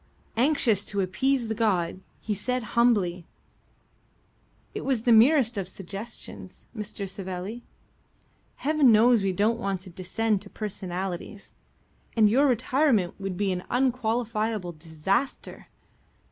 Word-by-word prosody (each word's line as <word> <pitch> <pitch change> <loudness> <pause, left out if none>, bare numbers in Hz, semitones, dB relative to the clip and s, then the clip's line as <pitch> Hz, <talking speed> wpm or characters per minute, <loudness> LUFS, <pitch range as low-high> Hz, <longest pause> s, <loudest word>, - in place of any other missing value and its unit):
Anxious 235 -5 +3
to 200 -1 -1
appease 240 +7 0
the 220 - -1
god, 195 -6 0 0.2
he 215 - -3
said 250 +5 -2
humbly: 195 -8 +2 1.5
"It - - -4
was 255 -5 0
the 240 - +3
merest 235 -1 +5
of 190 - -4
suggestions, 195 - -8
Mr. 205 -2 -5
Savelli. 190 +4 -6 0.9
Heaven 295 -3 +3
knows 230 +1 +5
we 195 -1 +1
don't 215 +5 +1
want 195 -4 -2
to 185 -1 -10
descend 195 +3 -1
to 200 - -10
personalities, 190 -1 -5 0.6
and 220 -2 +6
your 275 +5 +4
retirement 250 - +2
would 195 -2 -4
be 200 -1 0
an 180 0 -3
unqualifiable 230 -5 0
disaster. 165 - -3
210 Hz, 120 wpm, -26 LUFS, 190-240 Hz, 1.5 s, and